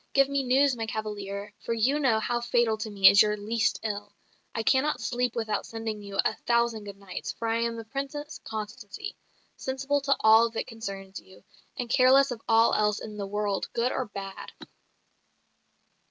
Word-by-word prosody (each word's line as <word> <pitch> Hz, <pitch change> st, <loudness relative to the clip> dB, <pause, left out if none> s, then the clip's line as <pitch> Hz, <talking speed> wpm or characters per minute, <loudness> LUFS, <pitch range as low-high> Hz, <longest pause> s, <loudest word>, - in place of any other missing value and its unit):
Give 275 Hz, -1 st, +5 dB
me 280 Hz, 0 st, 0 dB
news, 270 Hz, +1 st, +3 dB
my 225 Hz, -1 st, -4 dB
cavalier; 210 Hz, -2 st, -5 dB
for 230 Hz, -, -3 dB
you 260 Hz, +6 st, +2 dB
know 245 Hz, -6 st, +3 dB
how 240 Hz, +2 st, -1 dB
fatal 240 Hz, -2 st, +2 dB
to 215 Hz, 0 st, -5 dB
me 195 Hz, -2 st, +5 dB
is 200 Hz, -, +8 dB
your 210 Hz, 0 st, +2 dB
least 220 Hz, +2 st, 0 dB
ill. 205 Hz, -1 st, -4 dB, 0.4 s
I 225 Hz, -, -1 dB
cannot 270 Hz, +6 st, +2 dB
sleep 245 Hz, +2 st, -1 dB
without 220 Hz, -3 st, -1 dB
sending 225 Hz, -2 st, -5 dB
you 200 Hz, -1 st, -7 dB
a -, -, +2 dB
thousand 235 Hz, -2 st, +1 dB
good 200 Hz, -1 st, -8 dB
nights; 195 Hz, -2 st, -6 dB
for 230 Hz, -, -4 dB
I 225 Hz, 0 st, +1 dB
am 230 Hz, 0 st, -1 dB
the 225 Hz, -1 st, -7 dB
Princess 280 Hz, +5 st, -5 dB
Constancy, 215 Hz, -, -6 dB, 0.4 s
sensible 275 Hz, +2 st, -1 dB
to 275 Hz, 0 st, +2 dB
all 220 Hz, +1 st, +6 dB
that 225 Hz, -, -3 dB
concerns 195 Hz, -4 st, -7 dB
you, 190 Hz, -, -18 dB, 0.3 s
and 245 Hz, -, -3 dB
careless 260 Hz, +3 st, +5 dB
of 235 Hz, -2 st, -5 dB
all 225 Hz, +1 st, +5 dB
else 210 Hz, 0 st, +2 dB
in 215 Hz, -1 st, -8 dB
the 200 Hz, -1 st, -4 dB
world, 205 Hz, -1 st, -2 dB
good 235 Hz, +2 st, +1 dB
or 260 Hz, -, -1 dB
bad." 195 Hz, -1 st, -8 dB
225 Hz, 185 wpm, -27 LUFS, 210-250 Hz, 0.4 s, is